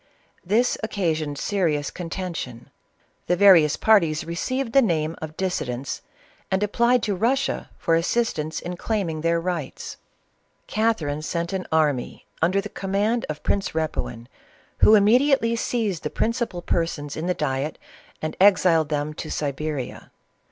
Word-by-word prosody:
This 220 +7 +1
occasioned 160 -9 -1
serious 160 -6 0
contention; 170 -9 -6 0.6
the 180 - +3
various 175 -6 +6
parties 170 -9 +3
re 170 - -5
ceived 255 +7 -2
the 275 - +7
name 165 -7 0
of 155 0 -7
dissidents, 135 -9 -3 0.5
and 190 +2 +1
applied 235 +3 +2
to 210 - 0
Russia 240 +8 0
for 165 - 0
assistance 165 -3 0
in 175 0 -6
claiming 185 -8 -2
their 170 +1 +2
rights. 170 -5 -4 0.7
Catherine 175 -10 0
sent 170 +3 -3
an 190 -1 -3
army 150 -5 0 0.2
under 180 +5 +3
the 205 - -6
command 205 +4 -1
of 155 -1 -5
Prince 200 -1 0
Repuin, 155 -7 -3 0.5
Who 220 - +7
immediately 235 +3 +4
seized 220 -7 -1
the - - -3
principal 230 -6 -2
persons 150 -4 -2
in 160 +3 -3
the 180 - +1
diet, 140 0 -2 0.5
and 155 0 -3
exiled 180 -6 +5
them 150 0 -2
to - - -7
Siberia. 145 -2 -4
175 Hz, 135 wpm, -24 LUFS, 155-210 Hz, 0.7 s, the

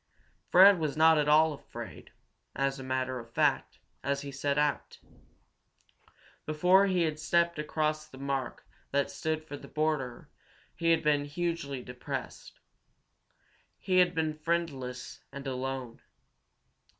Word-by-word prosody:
Fred 190 0 +8
was 155 -2 -2
not 160 0 +6
at 150 - +1
all 155 +1 +5
afraid, 145 - -10 0.5
as 135 0 -1
a - - -7
matter 130 0 -2
of 115 -1 -11
fact, - - +1 0.3
as 140 0 -1
he 140 - -7
set 140 +1 -1
out. 150 -1 0 1.5
Before 180 +6 +4
he 185 -2 +2
had 155 -2 -2
stepped 170 +1 +1
across 155 0 -1
the 130 - -14
mark 135 -2 -3 0.2
that 140 0 0
stood 155 +2 -2
for 150 -2 -8
the - - -12
border 150 -6 -2 0.5
he 165 - 0
had 165 -1 +3
been 145 -1 +2
hugely 145 -4 -3
depressed. 125 0 -7 1.2
He 185 -1 0
had 180 -1 +3
been 160 -1 0
friendless 150 -6 -3
and 140 0 -8
alone. 130 -2 -4
150 Hz, 135 wpm, -30 LUFS, 135-160 Hz, 1.5 s, Fred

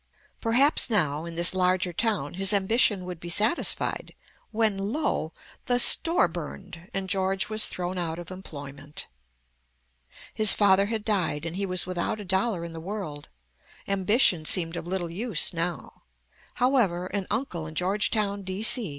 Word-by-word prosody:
Perhaps 260 +7 +4
now 160 -8 +1
in 170 -1 -7
this 170 +2 +5
larger 185 -1 +1
town 205 -7 -1
his 195 +2 +1
ambition 200 -1 +2
would 180 -2 -7
be 175 - -8
satisfied, 215 - 0 0.3
when, 220 -2 +1
lo! 200 - -2 0.4
the 245 - +2
store 330 - +4
burned, 175 +1 -9
and 195 0 -3
George 190 +1 0
was 215 0 +2
thrown 180 0 -4
out 165 -2 -3
of 175 0 -9
employment. 145 -5 -8 1.3
His 215 -2 +5
father 200 -1 +4
had 220 -1 -3
died, 175 -8 -1
and 165 +1 -5
he 200 +1 -2
was 185 -1 -1
without 185 +4 -3
a 205 - -7
dollar 190 -1 -1
in 170 - -9
the 165 - -7
world. 175 -6 -6 0.6
Ambition 195 -3 +3
seemed 165 +1 +3
of 170 - -6
little 175 -2 -3
use 200 -1 +1
now. 170 +1 -4 0.5
However, 235 -9 +1
an 195 0 -4
uncle 200 - -3
in 155 - -10
Georgetown, 200 +2 0
D.C. 200 +3 +3
190 Hz, 150 wpm, -26 LUFS, 170-210 Hz, 1.3 s, this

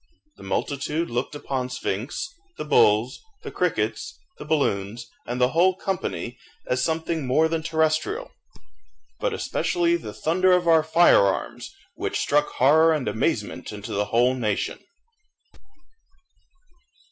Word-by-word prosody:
The - - -15
multitude 150 +3 -2
looked 120 +5 -2
upon 130 -3 -3
Sphinx, 125 - -3 0.3
the - - -5
bulls, 110 -4 +3 0.2
the - - -6
crickets, - - -2 0.2
the - - -8
balloons, 115 -6 -1 0.2
and 120 +1 -3
the 125 0 +4
whole 180 +5 +3
company, 185 -10 -4 0.3
as 125 0 0
something 160 -1 -1
more 155 +6 +3
than 165 0 -2
terrestrial, 160 - -1 0.9
but - - 0
especially 345 -5 0
the - - -8
thunder 185 +3 +2
of 180 -1 +2
our 165 -1 +6
fire 160 -9 +5
arms, 95 - -3 0.2
which - - -3
struck 150 +1 +2
horror 160 +5 +5
and 150 -5 -2
amazement - - -2
into 105 -1 -7
the 105 +1 0
whole 120 +4 +2
nation. 110 -6 -2
150 Hz, 130 wpm, -24 LUFS, 125-165 Hz, 0.9 s, our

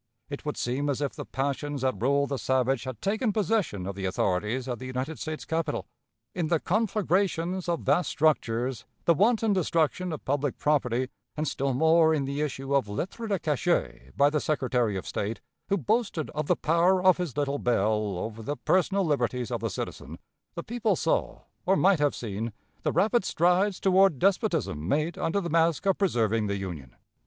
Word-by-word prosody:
It 140 - -6
would 150 - -2
seem 135 +4 -1
as 140 - -1
if 145 -2 -2
the - - -8
passions 140 0 -2
that 130 -3 0
rule 140 +3 +3
the 140 -2 -3
savage 130 +1 +1
had 130 -4 -7
taken 215 +3 +1
possession 205 - 0
of 100 - -3
the 95 0 -5
authorities 105 +7 -1
at 120 -3 -3
the 130 - -6
United 130 +5 -4
States 155 0 -5
capital! 165 0 -2 0.5
In 175 -3 -1
the 165 0 +2
conflagrations 185 -3 0
of 170 - 0
vast 180 - +2
structures, 130 -5 +1 0.2
the 170 - +6
wanton 220 +4 +3
destruction 175 0 0
of 155 - -6
public 145 0 -1
property, 130 -4 +1 0.3
and 155 +1 -1
still 135 -1 -1
more 160 +2 +4
in 140 -3 -1
the 140 +2 -3
issue 135 -2 -3
of 135 -7 +2
lettres 190 - -4
de 200 - +2
cachet 160 +2 -1
by 145 +1 +5
the 150 - +1
Secretary 125 -8 0
of 95 - -6
State, 105 +3 -3 0.3
who 200 - +2
boasted 205 - -1
of 150 -1 -3
the - - +3
power 175 +4 +2
of 185 -1 +6
his 175 -7 -4
little 145 -1 0
bell 105 -4 +1
over 110 +4 -5
the 145 +6 -4
personal 190 +1 +2
liberties 125 -5 -1
of - - -1
the - - -1
citizen, - - -6 0.4
the - - -4
people 230 -3 0
saw, 165 - -1 0.2
or 190 - +3
might 190 -3 +4
have 145 -1 +2
seen, 110 0 -4 0.3
the - - 0
rapid 220 +1 +2
strides 180 +3 +2
toward 190 -4 +4
despotism 175 - 0
made 155 - 0
under 175 +5 0
the 180 - -3
mask 165 +1 +2
of 195 -1 +2
preserving 115 - +1
the 100 0 -1
Union. 85 -10 -7
150 Hz, 185 wpm, -27 LUFS, 125-180 Hz, 0.5 s, the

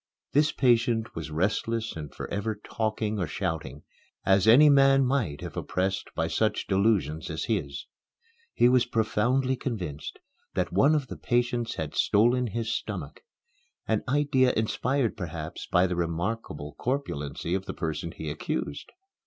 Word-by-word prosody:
This 150 +2 +3
patient 115 -3 +2
was 80 -2 -5
restless 110 +7 -1
and 75 -3 -7
forever 105 +2 -3
talking 110 -1 -2
or 90 - -1
shouting, 80 -3 -4 0.4
as 95 +1 +4
any 135 +7 +8
man 135 -1 +6
might 120 - -1
if - - -7
oppressed 95 +1 -2
by - - 0
such - - 0
delusions 95 -6 +1
as 80 -1 -3
his. 75 -11 -2 0.7
He 120 - +5
was 125 -1 +4
profoundly 120 +3 +1
convinced 90 - -5 0.4
that - - -1
one 145 +3 +5
of 145 -3 0
the - - -8
patients 120 -1 0
had 80 -3 -4
stolen 120 +4 +3
his 115 +1 -2
stomach - - -5 0.7
an 110 -1 +1
idea 135 -2 +3
inspired 120 +3 0
perhaps 80 -3 -6
by 90 +1 +3
the 90 -1 -1
remarkable 85 -3 -3
corpulency 85 - -2
of 95 0 -2
the - - -3
person 85 0 -3
he 80 - -7
accused. 75 -1 -4
110 Hz, 145 wpm, -27 LUFS, 85-125 Hz, 0.7 s, any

